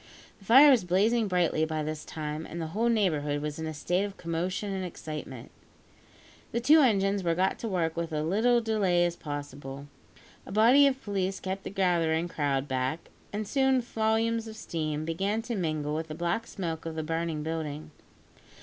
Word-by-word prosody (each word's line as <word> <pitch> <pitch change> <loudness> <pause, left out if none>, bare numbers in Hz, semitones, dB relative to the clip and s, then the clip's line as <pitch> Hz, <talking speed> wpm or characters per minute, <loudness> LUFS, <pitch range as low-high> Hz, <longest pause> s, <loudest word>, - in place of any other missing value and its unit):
The 195 - -18
fire 270 +7 +8
was 245 -7 +4
blazing 210 +6 +2
brightly 175 -4 +1
by 155 -1 -1
this 155 0 -4
time, 155 0 -5
and 170 - -7
the 165 - -2
whole 230 +3 +1
neighbourhood 155 -10 +1
was 150 +1 -4
in 160 - -3
a 155 - -4
state 180 +6 0
of 200 -1 -5
commotion 180 +4 -3
and 190 -1 -3
excitement. 155 -7 -7 1.0
The 235 - +1
two 295 +7 +6
engines 200 -5 +2
were 170 -1 +1
got 190 +2 +1
to 230 - -4
work 170 -5 -1
with 170 -1 -3
as 155 0 -1
little 235 +7 +3
delay 195 -6 +2
as 175 -1 -1
possible. 145 -2 -7 0.6
A - - -8
body 240 +8 +6
of 270 -1 -2
police 195 -2 -2
kept 190 +1 -4
the - - -3
gathering 175 -4 +1
crowd 145 -4 -1
back, 130 +4 -2 0.2
and 210 0 -3
soon 265 0 +3
volumes 225 0 0
of 220 - -8
steam 155 -7 -3
began 195 +7 -1
to 235 0 -3
mingle 155 -5 -2
with 160 +1 -3
the 155 - -6
black 175 +7 -1
smoke 165 -4 -4
of 160 - -5
the 160 - -2
burning 165 -1 -2
building. 155 -1 -4
175 Hz, 185 wpm, -28 LUFS, 155-215 Hz, 1.0 s, fire